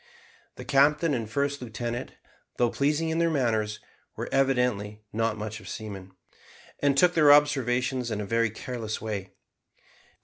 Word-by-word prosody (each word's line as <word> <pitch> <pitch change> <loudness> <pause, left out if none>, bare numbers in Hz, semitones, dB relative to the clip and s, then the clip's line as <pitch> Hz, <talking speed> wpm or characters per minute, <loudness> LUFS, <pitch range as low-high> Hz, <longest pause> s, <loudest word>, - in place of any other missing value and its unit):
The - - -9
captain 150 +3 +3
and 115 -4 -2
first 140 +3 -1
lieutenant, 120 +1 -5 0.4
though 120 -1 +2
pleasing 150 +3 0
in 160 +1 0
their 170 0 +3
manners, 110 -8 0 0.4
were - - -5
evidently 125 -6 +1
not 115 0 0
much 105 +1 -5
of - - -11
seamen, 95 -4 -7 0.7
and 140 -1 +2
took 175 +4 +5
their 150 -4 +6
observations 130 -3 +3
in 110 -2 -3
a 105 - -3
very 115 +2 +1
careless 110 0 -5
way. 105 -3 -5
120 Hz, 145 wpm, -27 LUFS, 110-140 Hz, 0.7 s, their